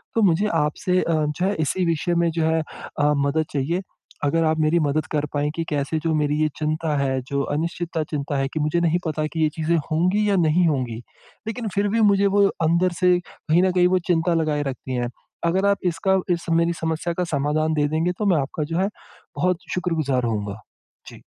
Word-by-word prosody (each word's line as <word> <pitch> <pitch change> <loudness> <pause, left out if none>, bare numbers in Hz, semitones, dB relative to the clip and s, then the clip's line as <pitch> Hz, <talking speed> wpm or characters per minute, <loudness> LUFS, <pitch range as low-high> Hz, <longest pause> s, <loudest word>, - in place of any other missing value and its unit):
तो 225 - +3
मुझे 190 +3 +3
आपसे 150 +5 0
अ, - - -1
जो 155 +3 0
है 200 - +1
इसी 175 +4 0
विषय 170 +1 0
में 170 - +2
जो 165 0 -1
है 160 0 +2 0.4
अ, 150 0 +3
मदद 140 +3 +1
चाहिए, 160 +7 0 0.4
अगर 165 +3 +2
आप 160 0 +1
मेरी 155 +2 +3
मदद 155 +2 0
कर 150 -1 0
पाएँ 145 0 0
कि 165 - -1
कैसे 150 +1 -1
जो 165 -1 +1
मेरी 150 0 +1
ये 155 - +2
चिंता 155 0 -1
है, 135 -1 0
जो 140 +2 -2
अनिश्चितता 170 0 -2
चिंता 145 -1 -2
है, 135 0 0
कि 155 - -4
मुझे 150 +3 +1
नहीं 170 +1 +2
पता 155 -1 -1
कि 160 - 0
ये 155 - +3
चीज़ें 160 +2 +1 0.2
होंगी 185 +6 +2
या 200 - +3
नहीं 165 +3 +3
होंगी, 125 -7 -1 0.5
लेकिन 225 +1 -3
फिर 200 +1 +2
भी 230 - +3
मुझे 200 0 +3
वो 200 -1 +6 0.2
अंदर 175 +2 +2
से 180 -1 +4
कहीं 170 +3 0
न 185 - +3
कहीं 180 -1 +4
वो 185 - +3
चिंता 170 0 +2
लगाए 155 -3 0
रखती 130 -1 -5
हैं। 120 -1 -1 0.4
अगर 190 +3 +1
आप 200 0 +3 0.2
इसका 190 +3 +1
इस 170 - -4
मेरी 170 +1 +2
समस्या 160 +1 -1
का 180 - -1
समाधान 150 +3 +1
दे 150 -1 +2
देंगे 165 +3 +1
तो 210 - 0
मैं - - +3
आपका 145 +3 -3
जो 165 - 0
है 195 +2 +1 0.5
बहुत 180 -1 +1
शुक्रगुज़ार 155 -8 0
होऊँगा। 105 -2 -3 0.5
जी। - - -12
160 Hz, 215 wpm, -23 LUFS, 150-175 Hz, 0.5 s, वो